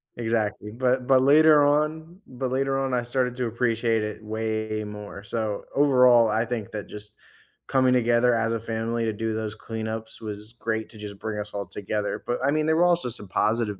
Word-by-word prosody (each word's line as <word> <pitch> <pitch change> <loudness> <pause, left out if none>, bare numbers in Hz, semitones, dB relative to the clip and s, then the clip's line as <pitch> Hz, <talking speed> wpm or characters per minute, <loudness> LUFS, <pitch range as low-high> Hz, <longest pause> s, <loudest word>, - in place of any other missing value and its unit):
Exactly, 110 -3 -2
but 125 +2 0
but 130 0 +5
later 150 +2 +6
on 155 +4 0
but 130 0 -4
later 135 +1 0
on, 135 -1 -1
I 125 -1 +1
started 125 0 0
to 125 -1 -2
appreciate 115 -1 0
it 105 0 -6
way 110 0 -2
more, 105 -1 -8
so, 105 -1 -3
overall, 125 -4 +5
I 110 +2 +1
think 115 -4 -4
that 105 -2 -6
just 105 0 -6 0.5
coming 130 -1 +3
together 120 0 +3
as 115 0 +1
a 115 - -1
family 115 +1 -2
to 110 - 0
do 110 +1 -2
those 110 0 -3
cleanups 110 0 -5
was 105 +1 -5
great 110 -2 -3
to 110 - -11
just 105 -1 -8
bring 110 -1 -4
us 105 0 -5
all 100 -1 -3
together, 105 +1 -3
but 120 - -1
I 140 - +3
mean, 155 0 +1
there 160 - +2
were 175 - +5
also 175 -7 +2
some 110 -3 -2
positive 105 0 0
115 Hz, 200 wpm, -25 LUFS, 110-130 Hz, 0.5 s, later